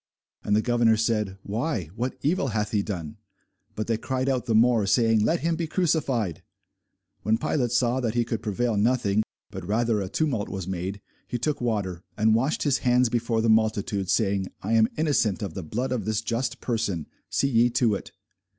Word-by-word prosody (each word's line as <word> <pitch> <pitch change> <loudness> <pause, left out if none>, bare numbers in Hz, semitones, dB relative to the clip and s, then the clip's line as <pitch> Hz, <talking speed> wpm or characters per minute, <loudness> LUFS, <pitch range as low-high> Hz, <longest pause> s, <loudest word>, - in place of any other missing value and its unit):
And 105 - +2
the 110 - +2
governor 120 -2 +3
said, 105 -3 0
Why, 110 - -2
what 125 +3 -3
evil 150 -1 +1
hath 105 -3 -1
he 105 - +2
done? 85 -7 -5 0.6
But 110 - -2
they 115 -1 0
cried 130 +2 -2
out 125 -2 -1
the 115 - +2
more, 115 -2 +4
saying, 115 0 +3
Let 165 +8 +1
him 165 0 +1
be 165 0 -2
crucified. 140 - 0 0.8
When 110 +3 +2
Pilate 125 +1 0
saw 125 +1 +2
that 120 -3 -1
he 120 -1 +2
could 115 -1 -3
prevail 110 +2 -1
nothing, 110 -2 +2 0.3
but 95 - -5
that 85 - -10
rather 110 0 +1
a 95 - -4
tumult 130 -6 -1
was 95 -3 -5
made, 95 +2 -4 0.3
he 120 - -2
took 145 +4 -2
water, 100 -7 -2
and 110 +1 +4
washed 130 +7 +1
his 140 -3 +2
hands 125 -1 +3
before 115 -1 0
the 115 - +1
multitude, 110 -3 +1
saying, 100 -1 +1 0.2
I 105 +4 -1
am 110 -1 +5
innocent 130 - +1
of 95 -5 -4
the 95 - -5
blood 120 +10 -3
of 120 -6 -1
this 110 0 0
just 115 +3 -2
person: 105 - -1 0.2
see 140 - +1
ye 120 -1 +4
to 120 -2 +2
it. 100 - -5
115 Hz, 195 wpm, -26 LUFS, 105-125 Hz, 0.8 s, am